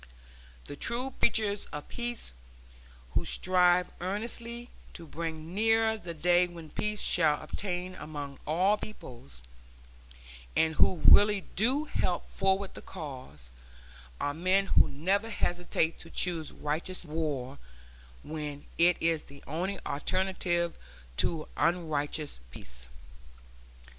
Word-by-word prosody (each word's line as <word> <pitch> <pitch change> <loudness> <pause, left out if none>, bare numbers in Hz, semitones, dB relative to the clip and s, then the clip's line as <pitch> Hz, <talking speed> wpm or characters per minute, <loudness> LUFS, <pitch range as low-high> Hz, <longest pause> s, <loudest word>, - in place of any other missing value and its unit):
The 145 - -7
true 240 - -1
preachers 210 -3 +2
of 150 0 -7
peace, 240 -1 -5 0.8
who - - +1
strive 180 -1 +3
earnestly 235 +5 -4 0.2
to 170 - -8
bring 160 +1 -5
nearer 225 +2 +3
the 175 -6 -7
day 175 +3 +4
when 170 -3 -10
peace 210 0 -1
shall 155 -4 +4
obtain 180 +3 -3
among 145 -5 -7
all 185 +7 +3
peoples, 120 - -10 1.1
and 160 0 +3
who 165 +1 +3
really 205 -1 +8
do 255 +9 +3
help 180 - -1
forward 195 0 +1
the - - -9
cause, 130 - -9 0.7
are 145 - 0
men 185 +5 +2
who - - +6
never 195 +10 0
hesitate 175 -5 0
to 165 - -10
choose 165 -3 -2
righteous 165 +5 -3
war 145 -4 -3 0.6
when 150 -2 -5
it 175 +1 +6
is 165 -1 +2
the 140 0 -15
only 185 +6 -2
alternative 175 +2 0 0.4
to 155 - 0
unrighteous 155 - 0
peace. - - -10
175 Hz, 115 wpm, -30 LUFS, 150-195 Hz, 1.1 s, really